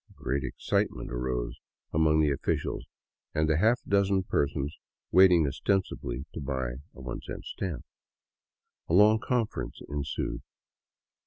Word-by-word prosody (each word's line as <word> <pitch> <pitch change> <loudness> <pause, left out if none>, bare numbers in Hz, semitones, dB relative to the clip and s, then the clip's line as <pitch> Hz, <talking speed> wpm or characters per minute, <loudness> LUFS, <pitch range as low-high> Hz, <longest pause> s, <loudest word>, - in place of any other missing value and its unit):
" - - -21
Great 70 +1 -2
excitement 65 - -1
arose 60 0 -2 0.3
among 80 0 +4
the 75 -2 +3
officials 70 - -2 0.5
and 80 0 +2
the 80 0 +3
half 115 +5 +4
dozen 100 -1 +3
per 75 -5 +2
sons 70 0 -4 0.4
waiting 90 -4 +7
ostensibly 70 -5 -1
to - - -5
buy 65 -3 -2 0.2
a - - -12
one 65 -1 -5
cent - - -7
stamp. 90 -5 -4 1.0
A 85 - +3
long 105 +3 +7
conference 120 -1 -2
ensued. 70 -1 -3
75 Hz, 135 wpm, -29 LUFS, 70-95 Hz, 1.0 s, waiting